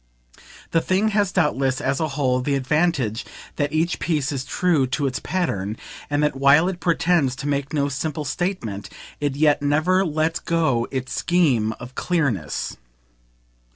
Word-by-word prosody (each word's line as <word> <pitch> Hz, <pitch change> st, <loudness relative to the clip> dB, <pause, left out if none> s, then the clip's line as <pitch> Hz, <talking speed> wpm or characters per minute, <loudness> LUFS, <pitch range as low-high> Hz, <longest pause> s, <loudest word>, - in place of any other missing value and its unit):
The 165 Hz, -, +3 dB
thing 195 Hz, +6 st, +1 dB
has 205 Hz, -3 st, +1 dB
doubtless, 135 Hz, -7 st, +1 dB
as 135 Hz, +1 st, -1 dB
a 160 Hz, -, +1 dB
whole, 130 Hz, -3 st, +2 dB
the 140 Hz, +2 st, 0 dB
advantage 135 Hz, -4 st, 0 dB, 0.3 s
that 145 Hz, -1 st, 0 dB
each 160 Hz, +2 st, 0 dB
piece 150 Hz, -4 st, 0 dB
is 135 Hz, -2 st, -3 dB
true 155 Hz, -2 st, +1 dB
to 140 Hz, +3 st, -1 dB
its 130 Hz, -2 st, -1 dB
pattern, 110 Hz, -, -2 dB, 0.3 s
and 145 Hz, 0 st, +1 dB
that 150 Hz, -, +1 dB
while 140 Hz, +5 st, +5 dB
it 185 Hz, -2 st, -3 dB
pretends 165 Hz, -6 st, +2 dB
to 140 Hz, -, -5 dB
make 140 Hz, -1 st, -1 dB
no 145 Hz, -3 st, +1 dB
simple 150 Hz, +2 st, -3 dB
statement 130 Hz, -, -3 dB, 0.3 s
it 145 Hz, -2 st, -1 dB
yet 150 Hz, 0 st, +3 dB
never 155 Hz, +6 st, +2 dB
lets 160 Hz, -1 st, 0 dB
go 140 Hz, -9 st, +1 dB
its 130 Hz, -1 st, -4 dB
scheme 135 Hz, -12 st, +2 dB
of 125 Hz, +3 st, -11 dB
clearness. 140 Hz, -, -1 dB
145 Hz, 155 wpm, -22 LUFS, 130-170 Hz, 0.3 s, while